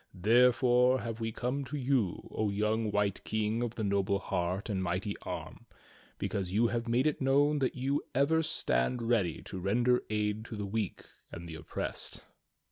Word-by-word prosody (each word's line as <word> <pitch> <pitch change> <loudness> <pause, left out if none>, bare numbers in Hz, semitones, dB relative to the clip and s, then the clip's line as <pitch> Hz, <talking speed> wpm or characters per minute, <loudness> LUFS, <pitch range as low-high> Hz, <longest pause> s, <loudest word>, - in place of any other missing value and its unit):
There 115 +7 +5
fore 125 +1 +3
have 115 0 -5
we 115 0 -2
come 125 +5 -2
to 150 +3 -4
you, 130 -8 0
O 110 -1 0
young 105 +2 0
White 100 -1 0
King 110 +1 -1
of 120 -1 -2
the 110 - -3
noble 100 -1 +1
heart 90 0 -2
and 100 -4 -1
mighty 95 +3 -2
arm, - - -7 0.5
because 95 -3 -2
you 110 +5 +3
have 120 0 -1
made 120 +4 +2
it 155 -2 0
known 145 +3 +3
that 130 - 0
you 135 +3 0
ever 150 +4 +3
stand 120 - 0
ready 115 -9 +1
to 95 - -6
render 120 +6 +2
aid 105 0 -1
to 115 - -7
the 105 -1 -3
weak 105 -1 -3 0.3
and 85 0 -8
the 80 - -7
oppressed." 80 - -5
110 Hz, 180 wpm, -31 LUFS, 100-125 Hz, 0.5 s, There